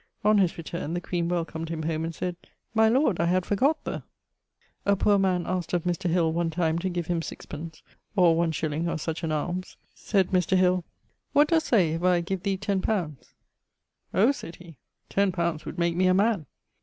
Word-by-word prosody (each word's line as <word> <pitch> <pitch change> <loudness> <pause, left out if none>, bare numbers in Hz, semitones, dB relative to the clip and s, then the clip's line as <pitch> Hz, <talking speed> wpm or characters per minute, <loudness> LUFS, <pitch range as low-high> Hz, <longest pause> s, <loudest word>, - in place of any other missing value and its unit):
On 210 0 +5
his 185 -4 +2
returne 165 0 -4
the - - 0
queen 175 -1 -2
welcomed 165 -2 -3
him 160 -1 -3
home 160 0 -1
and 165 0 -4
sayd, 180 +2 -3 0.4
'My 220 0 +5
lord, 245 - +2
I 170 - +2
had 180 +1 +1
forgot 275 +10 +1
the - - -4 0.4
...' - - -58 0.3
A 200 - +5
poor 200 +1 +3
man 185 -2 +1
askt 180 -2 -3
of 175 -2 +1
Mr. 175 +1 -1
Hill 165 -2 +2
one 170 0 0
time 165 0 0
to 185 +2 -1
give 175 -2 -3
him 170 -1 -1
6_d._ 160 0 -8 0.3
(or 175 -4 +5
1_s._ 160 +2 -1
or - - -2
such 160 +1 -4
an 160 - -1
almes). 175 +4 -3 0.2
Sayd 195 -3 0
Mr. 185 0 +2
Hill 180 -1 +3 0.5
'What 295 +1 +5
doest 325 -1 +2
say, 185 -10 +3
if 165 +1 -2
I 180 -1 +3
give 185 +1 -3
thee 195 0 -1
ten 200 -1 -1
pounds?' 170 - -3 0.8
'Oh!' 220 +8 +4
sayd 170 -11 -8
he, 170 -5 -14 0.3
'ten 200 -1 +1
pounds 170 -3 -2
would - - -6
make 170 -1 +1
me 185 +1 +3
a 185 - +4
man.' 200 - +2
175 Hz, 205 wpm, -26 LUFS, 165-190 Hz, 0.8 s, On